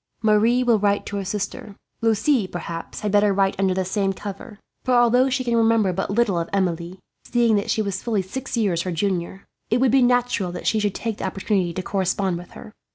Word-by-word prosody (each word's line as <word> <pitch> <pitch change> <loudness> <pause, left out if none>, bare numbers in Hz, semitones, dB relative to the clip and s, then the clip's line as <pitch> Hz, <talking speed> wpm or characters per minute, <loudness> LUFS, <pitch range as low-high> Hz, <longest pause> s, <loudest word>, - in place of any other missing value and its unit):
"Marie 220 +4 +3
will 235 -3 +3
write 205 0 +1
to 205 - -4
her 200 - -2
sister. 205 +1 -5 0.3
Lucie, 225 0 +2
perhaps, 170 -2 -6
had 210 - -1
better 205 0 +4
write 195 0 +1
under 190 -1 +2
the 190 0 -1
same 195 +1 0
cover; 200 +3 -8 0.3
for 255 - +2
although 245 +2 +4
she 260 0 -1
can 235 -1 0
remember 225 -4 +3
but 195 +2 -2
little 200 -4 +1
of 165 - -4
Emilie, 180 -2 -1 0.3
seeing 235 -2 +2
that 200 - -1
she 220 - +1
was 200 -2 -3
fully 215 -5 -1
six 255 +7 -5
years 190 -7 +1
her 185 - -3
junior, 185 +1 -2 0.2
it 235 - +2
would 255 -2 +3
be 270 +1 +4
natural 245 -6 +1
that 180 - -7
she 220 - +2
should 205 -2 -1
take 225 -3 -4
the - - -3
opportunity 190 -1 -1
to 185 +2 -5
correspond 190 -1 -1
with 175 - -12
her. 215 - -12
205 Hz, 220 wpm, -22 LUFS, 190-230 Hz, 0.3 s, better